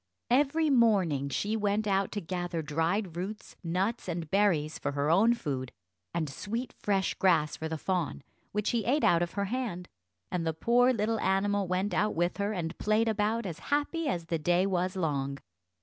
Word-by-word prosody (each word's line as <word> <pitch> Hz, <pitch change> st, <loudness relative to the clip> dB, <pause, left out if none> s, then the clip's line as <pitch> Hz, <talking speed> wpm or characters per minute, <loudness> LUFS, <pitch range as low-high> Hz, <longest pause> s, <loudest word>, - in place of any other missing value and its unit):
Every 295 Hz, +4 st, +3 dB
morning 190 Hz, -, +3 dB
she 210 Hz, +9 st, -1 dB
went 210 Hz, 0 st, 0 dB
out 195 Hz, -1 st, +1 dB
to 205 Hz, -, -2 dB
gather 175 Hz, -1 st, -3 dB
dried 165 Hz, +5 st, -1 dB
roots, 195 Hz, +5 st, -6 dB
nuts, 190 Hz, +8 st, -1 dB
and 170 Hz, -3 st, -4 dB
berries, 175 Hz, -7 st, +2 dB
for 145 Hz, -, -2 dB
her 145 Hz, +2 st, +1 dB
own 220 Hz, +7 st, +5 dB
food, 130 Hz, -, -4 dB, 0.4 s
and 165 Hz, -2 st, -1 dB
sweet 225 Hz, -, -4 dB
fresh 195 Hz, -2 st, 0 dB
grass 155 Hz, -6 st, +2 dB
for 160 Hz, -, -5 dB
the 160 Hz, -, -3 dB
fawn, 175 Hz, -4 st, -2 dB, 0.3 s
which 210 Hz, 0 st, 0 dB
he 235 Hz, -2 st, 0 dB
ate 275 Hz, +8 st, +1 dB
out 170 Hz, 0 st, +4 dB
of 175 Hz, -1 st, -2 dB
her 200 Hz, 0 st, -1 dB
hand, 210 Hz, -6 st, -3 dB, 0.4 s
and 180 Hz, -2 st, -1 dB
the 160 Hz, -1 st, 0 dB
poor 245 Hz, +8 st, +4 dB
little 225 Hz, -1 st, 0 dB
animal 200 Hz, 0 st, +1 dB
went 185 Hz, +2 st, 0 dB
out 210 Hz, +4 st, +1 dB
with 175 Hz, +2 st, 0 dB
her, 200 Hz, +1 st, 0 dB
and 175 Hz, -4 st, -3 dB
played 215 Hz, +2 st, +2 dB
about 220 Hz, +1 st, 0 dB
as 170 Hz, -3 st, -5 dB
happy 295 Hz, +3 st, 0 dB
as 175 Hz, -11 st, -1 dB
the 165 Hz, -1 st, -1 dB
day 175 Hz, +4 st, +2 dB
was 185 Hz, 0 st, 0 dB
long. 140 Hz, -6 st, -1 dB
190 Hz, 185 wpm, -30 LUFS, 165-215 Hz, 0.4 s, own